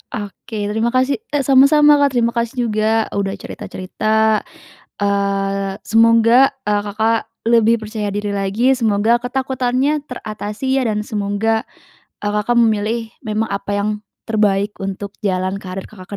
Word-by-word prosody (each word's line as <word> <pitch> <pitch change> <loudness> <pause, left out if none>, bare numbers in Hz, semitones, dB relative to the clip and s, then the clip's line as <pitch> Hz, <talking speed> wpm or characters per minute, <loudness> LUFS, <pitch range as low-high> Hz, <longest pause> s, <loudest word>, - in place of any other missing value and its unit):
Oke 205 0 -5
terima 220 +2 0
kasih, 255 - +1 0.2
e 285 - +1
sama-sama 290 +3 +6
Kak, 280 -2 +2
terima 235 -1 +2
kasih 235 +1 -1
juga 220 +1 +1
udah 195 -1 -2
cerita-cerita, 215 +3 -1 0.6
eee, 195 -1 -1
semoga, 230 +3 +5 0.2
eee, 210 0 +2
Kakak 220 +2 0 0.3
lebih 230 0 +4
percaya 215 -1 -4
diri 205 0 -3
lagi, 200 +7 +1
semoga 225 0 +2
ketakutannya 260 +3 0
teratasi 215 +2 -4
ya 270 - +2
dan 210 0 -2
semoga, 210 +2 -1 0.6
eee, 205 - 0
Kakak 210 +3 0
memilih 225 0 +1
memang 220 -2 -2
apa 200 0 -2
yang 205 +1 0 0.4
terbaik 210 -2 +1
untuk 195 +1 -5
jalan 190 -1 -1
karir 185 0 -6
Kakak 200 -1 -10
220 Hz, 135 wpm, -18 LUFS, 205-235 Hz, 0.6 s, sama-sama